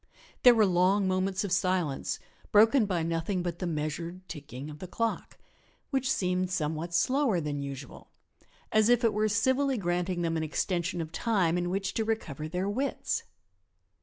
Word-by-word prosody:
There 245 -1 +8
were 220 -2 +5
long 190 +2 +3
moments 190 +2 0
of 200 - -4
silence 185 -6 0 0.3
broken 220 +2 +5
by 175 -4 0
nothing 165 +3 -1
but 170 -1 -4
the 180 - -2
measured 165 +4 -4
ticking 140 -4 -8
of 150 - -11
the 185 - -7
clock, 230 +5 -3 0.5
which 270 -1 +1
seemed 180 0 0
somewhat 160 -1 -2
slower 255 - +2
than 145 -2 -3
usual, 140 -1 -8 0.6
as 215 +1 +4
if 245 0 +4
it 230 - +3
were 215 +1 +1
civilly 260 +5 +2
granting 175 -1 -1
them 165 -1 0
an 160 - -1
extension 175 +2 -1
of 160 -1 -6
time 185 -4 +1
in 175 0 -1
which 195 +1 -2
to 225 - 0
recover 170 -10 -3
their 180 +4 -2
wits. 260 +8 -2
185 Hz, 165 wpm, -29 LUFS, 165-215 Hz, 0.6 s, There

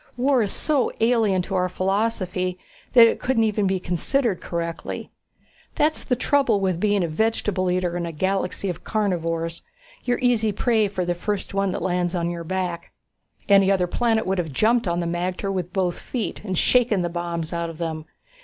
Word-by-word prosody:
War 260 0 +3
is 205 - 0
so 295 -5 +1
alien 225 -5 +2
to 195 - -6
our 180 -1 +1
philosophy 185 -1 -1 0.4
that 235 -3 +9
it 230 - +1
couldn't 250 -3 +1
even 210 -2 +1
be 190 0 0
considered 185 - 0
correctly. 170 -1 -4 0.6
That's 305 +1 +1
the 250 - +1
trouble 250 -4 +2
with 185 -3 0
being 205 -1 +2
a - - 0
vegetable 190 +1 0
eater 180 -1 0
in 170 -1 -2
a - - -4
galaxy 190 +4 -1
of 180 - -4
carnivores. 165 -5 -1 0.4
You're 245 0 +1
easy 235 -4 +2
prey 220 +1 +2
for 190 -2 -3
the 175 - 0
first 195 +4 -3
one 195 -1 +1
that - - -3
lands 180 -1 0
on 170 -1 -1
your 170 -1 -5
back. 180 -1 -3 0.5
Any 195 -1 +5
other 185 -2 +2
planet 225 +4 +1
would 190 0 0
have 165 -4 -2
jumped 225 - +2
on 170 0 0
the - - -2
magter 180 +3 -2
with 180 -2 -3
both 180 -2 -1
feet 225 -7 -4
and 190 -4 -3
shaken 230 -5 +3
the - - 0
bombs 170 -1 -4
out 170 0 -2
of 165 - -9
them. 160 -2 -4
190 Hz, 190 wpm, -23 LUFS, 175-220 Hz, 0.6 s, that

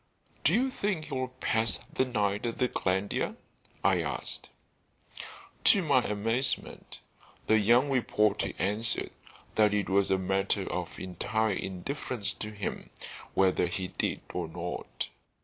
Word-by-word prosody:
"Do - - +5
you 260 +2 +2
think 195 -9 -1
he'll 130 -4 -2
pass 115 -3 0 0.2
the 130 - +2
night 105 -3 0
at 115 - -3
the 125 - +3
Glandier?" 95 -2 0 0.5
I - - +4
asked. - - -4 1.2
To 195 - +6
my 140 -5 +4
amazement 115 +5 -1 0.5
the 110 0 +5
young 120 +6 +5
reporter 105 -5 +2
answered 105 +4 0 0.4
that 105 -1 +4
it 100 -2 0
was 100 0 +3
a 95 - +4
matter 95 +1 0
of - - -4
entire 110 +4 0
indifference 105 +3 -3
to 105 - -6
him 105 -3 -5 0.5
whether 95 -2 +4
he 90 +1 -3
did - - -2
or 90 -2 -2
not. 85 +2 -5
105 Hz, 130 wpm, -30 LUFS, 95-125 Hz, 1.2 s, To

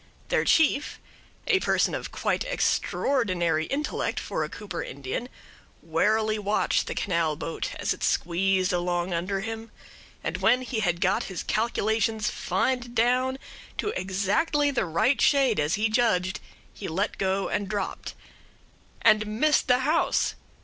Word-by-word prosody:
Their - - +2
chief, 295 -2 +2 0.5
a 415 -5 +3
person - - +1
of - - -4
quite - - -1
extraordinary 185 - 0
intellect 295 +2 -2
for - - -3
a - - -4
Cooper 200 -5 -6
Indian, 140 - -5 0.5
warily 215 +6 +1
watched 205 +1 +1
the - - -4
canal 170 -5 0
boat 165 - -4
as - - -1
it - - -9
squeezed 185 +2 +1
along 175 0 -1
under 185 +3 -1
him, 225 +1 -6 0.5
and - - -2
when 255 +1 +3
he 245 -3 -3
had 175 -4 0
got 190 +1 +2
his 190 -3 -5
calculations 220 -1 0
fined 245 +6 -1
down 250 +3 +2 0.4
to - - -1
exactly 210 - +1
the 260 - 0
right 170 - +1
shade, 270 - +4
as 150 +2 +1
he 215 +1 +1
judged, 215 -5 +1 0.3
he 200 - -7
let 190 +6 -2
go 195 0 0
and 200 -2 -2
dropped. 200 -2 -4 0.9
And 215 0 +5
missed 270 +8 +2
the 250 0 +4
house! 305 +5 +1
210 Hz, 140 wpm, -26 LUFS, 180-250 Hz, 0.9 s, And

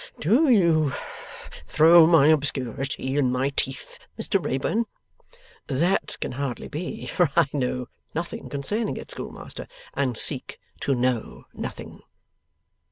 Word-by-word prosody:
'Do 245 - +3
you 165 - +4 0.8
throw 165 +1 +7
my 165 -4 +6
obscurity 135 -2 0
in 130 -3 +2
my 130 +2 +1
teeth, 135 -1 -3 0.2
Mr - - 0
Wrayburn?' 175 - 0 0.8
'That 170 +8 0
can - - -3
hardly 130 -1 -4
be, 165 +4 -5
for 175 -4 +1
I 170 -2 +5
know 125 -3 -1 0.3
nothing 170 +2 -4
concerning 205 +11 -2
it, - - -9
Schoolmaster, - - -8 0.3
and 130 -5 -1
seek - - +1 0.2
to 140 - 0
know 125 -2 -1
nothing. - - -7
145 Hz, 120 wpm, -25 LUFS, 130-170 Hz, 0.8 s, throw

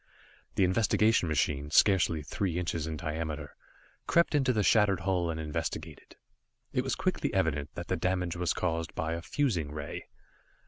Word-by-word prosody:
The - - +3
investigation 105 +1 +3
machine, 75 -1 0
scarcely 85 -2 +4
three 85 +4 -2
inches 85 -3 -2
in 80 -1 -4
diameter, 75 -1 -4 0.5
crept 170 -1 +3
into 135 -3 +3
the 110 -4 +1
shattered 100 -4 +4
hull 90 -2 0
and 80 -1 -3
investigated. 80 0 -5 0.6
It - - +1
was - - -1
quickly - - -1
evident 75 -3 0
that 85 - -5
the 95 - 0
damage 90 0 -1
was 90 0 0
caused 85 -2 -2
by 80 +1 -1
a 85 - -3
fusing 90 - -1
ray. 75 -1 -6
85 Hz, 155 wpm, -30 LUFS, 80-95 Hz, 0.6 s, scarcely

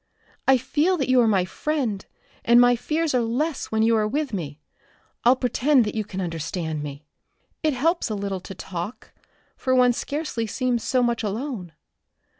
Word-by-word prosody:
I 265 -1 +6
feel 300 +8 +1
that 275 -4 -1
you 255 -1 +5
are 230 - +3
my 195 -4 +3
friend, 240 - -2 0.4
and 235 +1 +6
my 245 0 +6
fears 310 +5 -1
are 250 - +3
less 260 +6 -1
when 220 0 +1
you 230 0 +4
are 215 -1 +2
with 285 +2 -2
me. 155 -6 -4 0.6
I'll 245 +2 +6
pretend 255 +1 +2
that 210 - -3
you 220 - -1
can 195 -2 -7
understand 165 -2 -3
me. 145 0 -7 0.6
It 310 -2 +1
helps 330 +3 +1
a 215 - -2
little 200 -1 -3
to 190 - -9
talk, 180 +5 -7 0.4
for 260 0 0
one 250 -1 +5
scarcely 280 -4 -3
seems 245 +1 -1
so 255 +1 +1
much 235 -1 0
alone. 215 - -4
235 Hz, 180 wpm, -24 LUFS, 195-265 Hz, 0.6 s, I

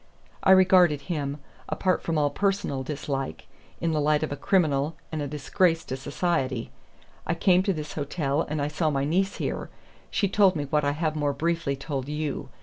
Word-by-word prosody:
I - - +2
regarded 185 -5 +6
him, 145 -4 -3 0.3
apart 185 -1 +1
from 165 -2 -1
all 145 -1 +2
personal 195 -6 0
dislike, 135 -1 -4 0.3
in 165 - 0
the 155 -1 +1
light 150 +1 +2
of 155 - -2
a - - -1
criminal 150 -2 +1 0.2
and 155 -2 -3
a 145 - -2
disgrace 165 +4 +1
to 130 - -4
society. 135 -3 -1 0.6
I 170 - +1
came 180 +1 +4
to 195 - +1
this 155 -4 -5
hotel, 145 0 -1
and 150 -2 -2
I - - 0
saw 155 +1 0
my 140 -2 0
niece 190 +6 +1
here. - - -3 0.4
She 200 - +1
told 195 -1 +4
me 150 - -1
what 150 +2 +1
I 145 0 +1
have 155 0 -1
more 145 -2 0
briefly 165 -1 -1
told 135 -1 -4
you. 150 -1 -3
150 Hz, 190 wpm, -26 LUFS, 145-175 Hz, 0.6 s, regarded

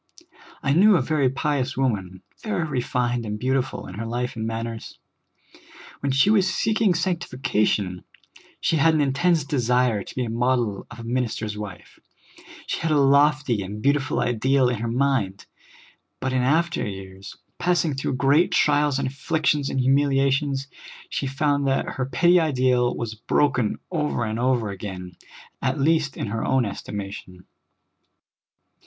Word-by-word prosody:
I 135 - +2
knew 200 +6 +6
a 165 - +3
very 145 -2 +1
pious 140 -1 -1
woman, 95 -8 -2 0.2
very 215 -6 -2
refined 125 -3 -1
and 105 -1 -4
beautiful 130 +2 -1
in 95 - -9
her 115 - -3
life 125 +2 -3
and 110 0 -3
manners. 115 0 -5 1.0
When 140 - -1
she 135 +10 +4
was 190 -3 +3
seeking 215 -4 +1
sanc 175 0 0
tification, 105 - -1 0.6
she 165 - +1
had 160 +2 +4
an 155 - +2
intense 150 +4 +2
desire 125 -5 +1
to - - -11
be 125 - -1
a - - -5
model 120 -3 0
of 120 -1 -11
a - - -7
minister's 115 -3 -2
wife; 105 -3 -9 0.7
she - - -3
had 165 - -1
a 155 - +3
lofty 140 -4 +3
and 100 +2 -6
beautiful 140 +2 +1
ideal 130 +2 +2
in 120 -3 -2
her 115 - -2
mind. 115 -6 0 0.7
But 130 0 -2
in 130 - +2
after 165 +7 +1
years, 95 -1 -8 0.2
passing 175 -3 +1
through 135 -1 -2
great 140 +7 +3
trials 145 -2 +2
and 140 -1 -1
afflictions 145 +1 0
and 135 - -1
humiliations, 135 +1 +2 0.4
she 140 - -2
found 140 +1 0
that 135 0 0
her 130 -1 -3
petty 175 +5 +4
ideal 130 -5 +2
was 115 -2 -4
broken 125 +1 0
over 150 -8 -1
and 110 +1 -3
over 120 -4 +1
again, 95 -2 -7 0.5
at 135 +2 -1
least 150 -1 +1
in - - -3
her 110 +2 -3
own 130 -2 +2
estimation. 100 -2 -7
130 Hz, 155 wpm, -24 LUFS, 115-145 Hz, 1.0 s, knew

